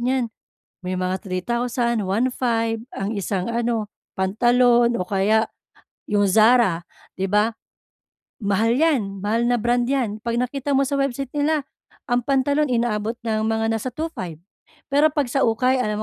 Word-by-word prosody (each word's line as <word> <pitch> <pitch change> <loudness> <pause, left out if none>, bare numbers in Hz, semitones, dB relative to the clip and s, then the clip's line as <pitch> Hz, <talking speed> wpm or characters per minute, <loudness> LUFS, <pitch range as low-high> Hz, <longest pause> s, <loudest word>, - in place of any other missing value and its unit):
niyan, 245 -2 0 0.5
may 185 - -1
mga 185 +1 -1
3,000, 235 +3 -1
1,500 230 +1 0 0.2
ang 195 +2 -3
isang 195 +1 -2
ano, 230 -2 -1 0.2
pantalon 240 +4 +3
o - - 0
kaya 210 +3 +2 0.7
'yong 205 -1 +3
Zara, 215 -4 +4 0.3
'di 190 - -1
ba? 210 +2 +3 0.9
Mahal 215 +4 +2
'yan. 255 -11 +1
Mahal 230 +3 +1
na 245 - +3
brand 240 +2 +1
'yan, 235 -6 -1
'pag 235 0 -2
nakita 265 +3 -2
mo 275 - +3
sa 280 +1 -1
website 275 -1 -2
nila 295 0 0 0.5
ang 245 0 +3
pantalon 280 +2 +2
inaabot 230 -1 0
ng 220 -1 0
mga 225 0 0
nasa 225 +3 -2
2,500. 245 - -5 0.6
Pero 295 +2 +5
'pag 290 -3 0
sa 275 - +2
ukay, 250 +3 +2
alam 210 -2 -1
235 Hz, 145 wpm, -22 LUFS, 210-255 Hz, 0.9 s, Pero